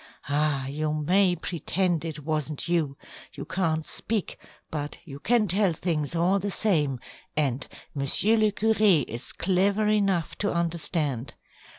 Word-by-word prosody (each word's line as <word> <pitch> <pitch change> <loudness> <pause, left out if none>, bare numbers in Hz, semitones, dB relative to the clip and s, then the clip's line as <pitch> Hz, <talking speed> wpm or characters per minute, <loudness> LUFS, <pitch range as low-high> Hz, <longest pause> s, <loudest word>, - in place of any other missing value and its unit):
Ah, 145 -2 +1
you 150 +3 -2
may 180 +5 +3
pretend 175 0 -1
it 155 -3 -6
wasn't 155 -1 -2
you. 160 -5 0 0.4
You - - -7
can't 160 -4 -1
speak, 220 -4 -3 0.3
but 145 -1 -4
you 140 -4 -9
can 220 +5 +2
tell 190 0 +3
things 160 -2 -2
all 180 +4 +2
the 205 +2 -2
same, 150 - +2 0.4
and 135 -3 0 0.3
Monsieur 145 +10 +2
le 215 -1 +3
curé 210 - +3
is 115 +2 -5
clever 195 +4 +1
enough 195 -6 +1
to 205 - +1
understand. 160 -6 0
165 Hz, 135 wpm, -26 LUFS, 150-195 Hz, 0.4 s, may